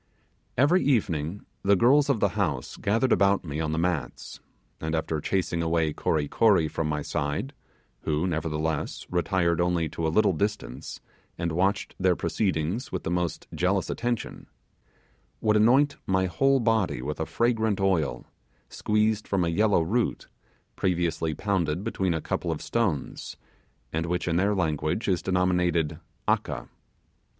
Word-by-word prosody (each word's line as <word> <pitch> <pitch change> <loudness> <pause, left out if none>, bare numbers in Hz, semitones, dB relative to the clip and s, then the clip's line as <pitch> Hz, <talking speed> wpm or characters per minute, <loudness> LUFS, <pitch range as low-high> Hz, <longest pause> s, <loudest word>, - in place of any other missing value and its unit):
Every 155 +9 +4
evening 95 - 0 0.2
the 100 +1 +4
girls 140 +8 +4
of 130 -6 +2
the - - +3
house - - -2
gathered 115 +6 +1
about 100 0 +3
me 75 -1 -4
on 80 -1 -1
the 80 - -1
mats, 85 -4 -2 0.4
and 80 +1 -2
after 80 -1 -2
chasing 90 -1 -1
away 80 -2 +1
Kory 75 -1 0
Kory 95 -6 +3
from 75 +1 -2
my 75 -1 -1
side 75 - -2 0.5
who 75 +3 -1
nevertheless, 80 -2 -2
retired 85 -1 +1
only 85 -2 +1
to 80 +2 -2
a - - +2
little 95 +3 +3
distance 75 - -3 0.4
and 85 -1 -2
watched 95 +5 0
their 95 -1 +3
proceedings 95 - -1
with - - -3
the - - -2
most 90 -3 -1
jealous 95 +2 0
attention 120 -1 -3 0.9
would 110 -1 +2
anoint 130 +7 +4
my 95 0 +2
whole 135 +9 +2
body 110 - +1
with 75 +2 -4
a 80 - -2
fragrant 110 -3 +1
oil, 95 -6 0 0.4
squeezed 105 0 0
from 95 -3 +1
a - - 0
yellow 100 0 +3
root, 115 +8 -1 0.5
previously 85 -3 0
pounded 90 -3 -1
between 95 -6 -1
a 80 - -2
couple - - -2
of - - -4
stones, 100 - -2 0.6
and 80 +1 -1
which 90 +1 -1
in 85 -1 +1
their 100 +3 +2
language 80 +3 -1
is 90 -3 +1
denominated 90 -4 +1 0.3
'aka'. - - 0
90 Hz, 150 wpm, -26 LUFS, 80-105 Hz, 0.9 s, Every